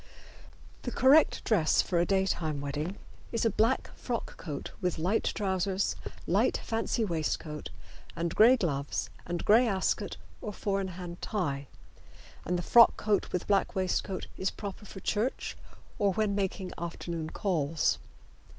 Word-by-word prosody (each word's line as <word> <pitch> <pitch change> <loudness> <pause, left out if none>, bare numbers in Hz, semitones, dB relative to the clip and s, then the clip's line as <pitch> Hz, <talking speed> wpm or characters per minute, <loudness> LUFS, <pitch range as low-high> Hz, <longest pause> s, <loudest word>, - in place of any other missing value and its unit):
The - - -3
correct 270 +6 +5
dress 170 -9 +3
for 175 - 0
a 170 - +2
daytime 185 -6 +1
wedding 150 +7 -3 0.3
is 230 -1 0
a 225 - +4
black 230 +6 +1
frock 240 -2 -4
coat 150 -5 -6
with 180 -2 0
light 180 +7 +1
trousers, 190 -1 0 0.3
light - - +2
fancy 225 0 0
waistcoat 155 -3 -2 0.5
and 170 0 -2
gray 240 +4 +7
gloves 145 - -2 0.2
and 175 0 -3
gray 230 +4 +6
Ascot 195 -3 0 0.2
or 210 - -5
four 195 0 -1
in 190 - -2
hand 175 -1 -7
tie, 145 -10 -2 0.8
and 180 +1 0
the 175 - -3
frock 235 +4 +7
coat 210 -2 0
with 180 - -2
black 200 -2 +1
waistcoat 190 0 -1 0.3
proper 205 0 -6
for 190 -1 -9
church 220 +8 -1 0.4
or 200 -2 +3
when 210 +1 +1
making 195 -1 -2
afternoon 170 -1 -4
calls. 160 -6 0
190 Hz, 140 wpm, -30 LUFS, 170-210 Hz, 0.8 s, gray